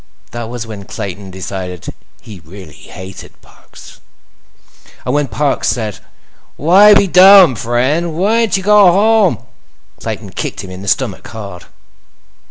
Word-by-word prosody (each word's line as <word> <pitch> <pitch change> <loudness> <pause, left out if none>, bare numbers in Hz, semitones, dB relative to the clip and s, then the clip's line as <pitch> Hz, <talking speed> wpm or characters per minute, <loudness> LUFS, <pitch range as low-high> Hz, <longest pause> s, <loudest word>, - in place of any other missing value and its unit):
That 120 -1 -6
was 120 -1 -6
when 105 -3 -9
Clayton 100 -2 -7
decided 95 -1 -7 0.3
he 105 -5 -12
really 80 0 -13
hated 95 +5 -12
Parks. - - -17 1.1
And 125 - -2
when 145 -1 0
Parks 145 -1 -1
said: 110 -4 -3 0.6
"Why 195 +7 +5
be 200 - +4
dumb, 185 -5 +7
friend? 130 +9 -1
Whyn't 220 +3 +1
you 190 - -6
go 205 -2 +5
home?" 205 - +2 0.5
Clayton - - -6
kicked - - -5
him 95 - -10
in 95 0 -9
the 100 - -10
stomach, - - -2
hard. 100 -5 -10
120 Hz, 135 wpm, -14 LUFS, -, 1.1 s, dumb